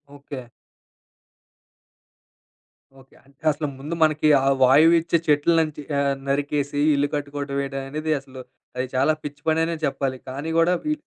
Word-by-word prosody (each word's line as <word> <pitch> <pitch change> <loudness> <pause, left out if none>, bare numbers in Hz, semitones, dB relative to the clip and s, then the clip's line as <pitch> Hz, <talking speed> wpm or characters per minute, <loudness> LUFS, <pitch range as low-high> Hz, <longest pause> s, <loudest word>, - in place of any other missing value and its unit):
Okay. 140 -2 -8 2.6
Okay. 130 - -23
అంటే 140 0 -26
అసలు 150 +1 -3
ముందు 150 +5 -5
మనకి 155 0 +2 0.2
ఆ - - +1 0.2
వాయువిచ్చే 165 +5 +5
చెట్ల 150 +2 +3
నంచి 155 -2 -2 0.2
ఆహ్, 140 -1 +1
నరికేసి 145 0 -1 0.2
ఇల్లు 145 +1 +1
కట్టుకోవడం 145 -1 -4
వేయడం 135 -1 -3
అనేది 155 +2 -3
అసలు 130 -1 -11 0.4
అది 130 0 -1
చాలా 155 +4 +3
పిచ్చిపననే 160 +3 -1
చెప్పాలి. 135 -1 -2
కానీ 140 +5 -5
కూడా 175 +2 +4
వీ 305 - +1
145 Hz, 130 wpm, -23 LUFS, 140-155 Hz, 2.6 s, వాయువిచ్చే